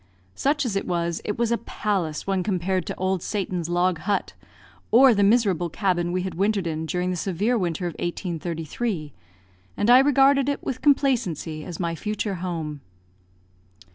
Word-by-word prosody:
Such 285 0 0
as 220 -5 -2
it 195 - -2
was, 170 -1 -1
it 210 - -3
was 235 0 0
a 235 - +1
palace 190 -9 -2
when 195 -1 0
compared 185 -1 -1
to - - -3
Old 185 -1 -1
Satan's 180 -5 -3
log 175 -1 +1
hut, 200 +6 -1 0.6
or 255 +1 +7
the 205 - +1
miserable 200 -5 +3
cabin 175 -1 0
we 180 0 -1
had 185 -2 -4
wintered 195 +2 0
in 160 -1 -3
during 180 +2 -1
the - - -2
severe 195 +7 0
winter 180 -4 -1
of 175 - -1
1833, 170 - -3 0.6
and 205 +4 +3
I 250 - +9
regarded 275 0 +4
it 285 - -2
with 255 - -4
complacency 230 - +1
as 170 -1 -7
my 170 -2 -1
future 210 +4 -3
home. 160 -5 -4
185 Hz, 170 wpm, -24 LUFS, 170-220 Hz, 0.6 s, I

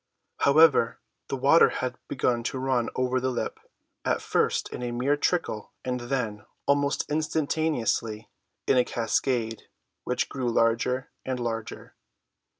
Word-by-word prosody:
However, 140 -5 +5 0.3
the - - -2
water - - +6
had - - -3
began 120 -2 0
to 130 - -2
run 130 -2 0
over 130 0 +1
the 130 +1 0
lip—at 125 - -4
first - - 0
in - - -6
a 120 - -2
mere 130 +4 +1
trickle, 145 - -1
and 125 0 -1
then, 120 -4 -2 0.2
almost 140 0 +1
instantaneously, 150 -8 -1 0.4
in 130 - +3
a 125 - +5
cascade, 115 -1 -1 0.3
which 125 0 -1
grew 130 -3 -2
larger 115 +3 +1
and 130 -1 -3
larger. 115 -2 -5
125 Hz, 130 wpm, -27 LUFS, 115-140 Hz, 0.4 s, water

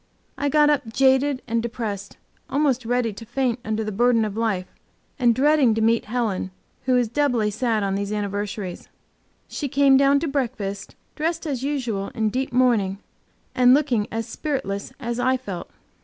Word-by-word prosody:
I 285 +1 -1
got 300 +1 +4
up 265 -6 -1
jaded 265 +2 +3
and 230 0 0
depressed, 215 -4 -5 0.3
almost 270 -4 +1
ready 245 -2 0
to 215 - -10
faint 245 +1 -1
under 220 +1 -2
the 215 - -3
burden 230 +1 +3
of 210 -1 -5
life, 215 -5 -1 0.5
and 240 -3 +4
dreading 280 -4 +4
to 225 - 0
meet 225 +1 +2
Helen, 215 -5 -2 0.4
who 255 -1 +3
is 245 -2 +2
doubly 240 -4 +1
sad 220 -1 0
on 195 -1 0
these 200 +1 -2
anniversaries. 205 -2 -4 0.6
She 290 - -4
came 275 0 +4
down 275 +1 +4
to 330 - -1
breakfast 230 -8 -3 0.2
dressed 330 +2 -2
as 275 -5 -2
usual 245 -8 -2
in 220 -2 +1
deep 260 +4 -2
mourning, 235 -6 +2 0.6
and 250 0 +6
looking 255 -8 +1
as 225 +1 -3
spiritless 240 -6 -3
as 235 -2 -3
I 260 +1 +2
felt. 195 -9 -7
240 Hz, 170 wpm, -23 LUFS, 215-270 Hz, 0.6 s, and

